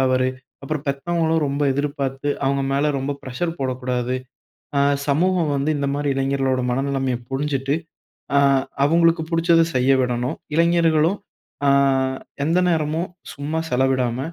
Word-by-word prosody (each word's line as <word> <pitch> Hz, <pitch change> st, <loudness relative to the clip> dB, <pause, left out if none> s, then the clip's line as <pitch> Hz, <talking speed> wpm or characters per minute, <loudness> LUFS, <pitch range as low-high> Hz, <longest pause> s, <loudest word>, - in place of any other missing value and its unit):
தவறு. 130 Hz, -1 st, +2 dB, 0.3 s
அப்புறம் 150 Hz, +1 st, -4 dB
பெத்தவங்களும் 160 Hz, +2 st, 0 dB
ரொம்ப 140 Hz, +1 st, -2 dB
எதிர்பார்த்து, 140 Hz, -1 st, -2 dB, 0.2 s
அவங்க 140 Hz, 0 st, +1 dB
மேல 145 Hz, +2 st, +2 dB
ரொம்ப 135 Hz, +2 st, -2 dB
பிரஷர் 165 Hz, +7 st, -3 dB
போடக்கூடாது. 125 Hz, -1 st, -1 dB, 0.6 s
அ -, -, +3 dB, 0.3 s
சமூகம் 170 Hz, +1 st, +2 dB
வந்து 140 Hz, +3 st, 0 dB
இந்த 140 Hz, -1 st, -1 dB
மாரி 145 Hz, 0 st, -1 dB
இளைஞர்களோட 135 Hz, -1 st, 0 dB
மனநிலைமைய 135 Hz, -1 st, 0 dB
புரிஞ்சுட்டு, 135 Hz, 0 st, -1 dB, 0.6 s
அ -, -, +6 dB, 0.5 s
அவங்களுக்கு 165 Hz, +1 st, +3 dB
பிடிச்சத 165 Hz, 0 st, +4 dB
செய்ய 130 Hz, +2 st, +3 dB
விடணும். 125 Hz, 0 st, -1 dB, 0.2 s
இளைஞர்களும் 170 Hz, +1 st, +3 dB, 0.5 s
அ -, -, +4 dB, 0.8 s
எந்த 165 Hz, +4 st, +2 dB
நேரமும் 160 Hz, +1 st, 0 dB, 0.2 s
சும்மா 150 Hz, +3 st, -3 dB
செலவிடாம, 130 Hz, -1 st, +1 dB
140 Hz, 120 wpm, -22 LUFS, 135-160 Hz, 0.8 s, அ